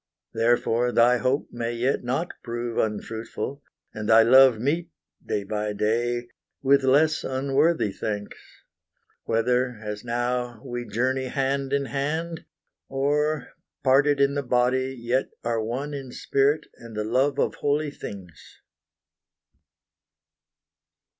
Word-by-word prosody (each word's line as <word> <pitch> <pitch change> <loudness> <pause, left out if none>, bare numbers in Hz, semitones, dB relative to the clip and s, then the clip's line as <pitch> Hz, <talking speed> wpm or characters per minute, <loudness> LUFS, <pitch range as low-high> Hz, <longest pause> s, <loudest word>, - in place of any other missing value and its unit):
Therefore 120 +1 +2
thy 120 +1 +5
hope 130 +3 0
May 120 0 -3
yet 125 +3 0
not 135 +8 -1
prove 120 -1 -3
unfruitful, 110 +5 -3 0.3
and 105 0 -5
thy 115 0 +8
love 130 0 +7
Meet, 160 +9 -1 0.3
day 100 - -2
by 105 +1 -2
day, 120 +3 0 0.4
with 140 +1 +5
less 150 +4 +3
unworthy 135 -1 +1
thanks 105 0 -4 0.9
Whether, 125 +2 +1
as 105 0 -6
now, 120 0 -2
we 120 -2 -5
journey 130 +5 0
hand 135 +1 -1
in 140 0 +1
hand 160 +6 -3 0.4
Or, 145 +1 0 0.3
parted 140 +2 +4
in 140 0 +3
the 145 - -1
body, 130 +1 +1
yet 120 +3 0
are 115 -1 0
one 130 +6 -3
In 135 -3 -6
spirit 140 +4 +1
and 115 -2 -11
the 105 - 0
love 130 +6 +1
of - - +1
holy 145 +1 +1
things. 95 - -10
125 Hz, 120 wpm, -25 LUFS, 115-140 Hz, 0.9 s, thy